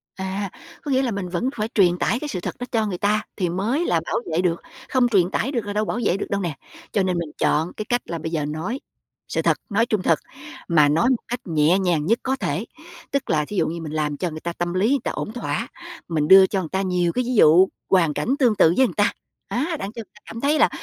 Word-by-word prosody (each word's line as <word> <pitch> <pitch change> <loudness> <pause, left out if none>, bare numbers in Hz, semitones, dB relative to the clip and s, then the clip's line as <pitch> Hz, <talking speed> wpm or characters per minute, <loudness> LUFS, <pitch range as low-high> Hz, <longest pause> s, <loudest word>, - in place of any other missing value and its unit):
À, 190 +1 -3 0.3
có 290 - -4
nghĩa 260 0 +3
là 250 -3 0
mình 195 -3 -4
vẫn 210 +9 -1
phải 215 -1 -1
truyền 180 -4 +4
tải 235 +7 0
cái 300 - -4
sự 210 -10 -3
thật - - -4
đó 245 - -3
cho 220 -3 +1
người 185 -4 -3
ta 210 +2 +1
thì 180 -4 -1
mới 230 - 0
là 165 - +2
bảo - - -2 0.2
vệ 175 - +2
được, 170 -2 0 0.3
không 255 -2 +3
truyền 190 -6 +3
tải 270 - -1
được 235 -6 -2
là 205 - -4
đâu 215 +1 0
bảo 240 - -2
vệ 185 - +2
được - - -3
đâu 200 0 -1
nè, 170 -5 -3 0.4
cho 200 - +1
nên 180 -2 0
mình 165 -3 -3
chọn 160 +4 +1
cái 215 - -5
cách 245 +2 0
là 170 - -4
bây 160 +1 -5
giờ 155 -3 -1
nói 165 - -3 0.5
sự - - -1
thật, - - +2
nói 225 +3 +2
trung 215 -5 0
thực, 165 -4 +2 0.5
mà 150 -4 +5
nói 165 - +3
một 255 - 0
cách 245 +1 -3
nhẹ 160 +3 +3
nhàng 170 -5 +1
nhất 230 +5 +2
có 265 +1 0
thể. 225 -4 -2 0.5
Tức 280 -1 -1
là 150 -1 +2
thí 205 - -6
dụ 165 - +2
như 165 +1 -4
mình 155 -2 -6
làm 150 -2 -1
cho 180 - -1
người 155 0 -7
ta 170 +1 -4
tâm 175 0 -3
lý 195 +6 +2
người 280 -1 +3
ta - - -1
ổn 215 - -5
thỏa, 245 - -3 0.4
mình 155 -3 0
đưa 190 0 +9
cho 195 - -1
người 160 - -6
ta 190 0 0
nhiều 180 -2 +1
cái 250 - 0
ví 250 - -1
dụ, 180 +1 +7 0.2
hoàn 170 -5 +3
cảnh 225 - 0
tương 240 -5 +4
tự 165 -2 +5
với 260 - +6
người - - -7
ta, 205 +2 +3 0.4
á, 310 +8 -1
đặng 195 - -4
cho 230 - -9
người 220 - -9
ta 210 - -18
cảm 230 +1 -8
thấy 295 +2 +2
là - - +5
190 Hz, 280 wpm, -23 LUFS, 170-230 Hz, 0.5 s, đưa